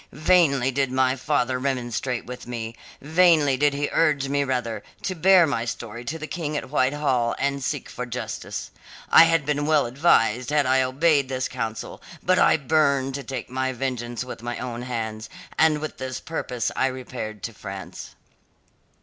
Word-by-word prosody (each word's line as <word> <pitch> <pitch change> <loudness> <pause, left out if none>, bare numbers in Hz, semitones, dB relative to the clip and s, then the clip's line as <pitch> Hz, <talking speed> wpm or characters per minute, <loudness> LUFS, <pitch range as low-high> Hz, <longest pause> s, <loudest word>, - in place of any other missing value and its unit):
Vainly 150 -4 +3
did 135 0 0
my 130 0 +2
father 130 -2 0
remonstrate 125 -2 -2
with 125 0 -8
me; 115 -2 -5 0.3
vainly 160 -3 +4
did 145 +2 +2
he 145 0 -1
urge 145 -4 +2
me 140 0 +1
rather: 125 -4 -2 0.2
to 185 - -1
bear 185 0 +6
my 140 -7 -1
story 115 0 -6
to 155 +6 -3
the 155 - -6
King 155 -3 -3
at 140 - -6
Whitehall 130 -4 +1
and 140 -1 -1
seek 145 +1 -3
for 125 0 -6
justice. 125 +1 -5 0.4
I 165 - +9
had 165 -3 +2
been 145 0 0
well 155 -2 +3
advised 125 -3 +2
had 150 -1 +2
I 130 +1 +3
obeyed 140 +1 +2
this 130 -1 -1
counsel, 115 -3 -5 0.2
but 185 0 +3
I - - +5
burned 140 -2 +1
to 140 +1 -4
take 125 -1 -6
my 130 0 -1
vengeance 120 -2 -3
with 125 - -8
my 120 +1 -4
own 120 -2 -5
hands, 110 -3 -4 0.3
and 160 -1 +4
with 155 0 -6
this 130 -1 -4
purpose 125 -7 -3
I 130 - +2
repaired 125 -5 -6
to 115 - -4
France. 95 -2 -8
130 Hz, 175 wpm, -24 LUFS, 125-150 Hz, 0.4 s, I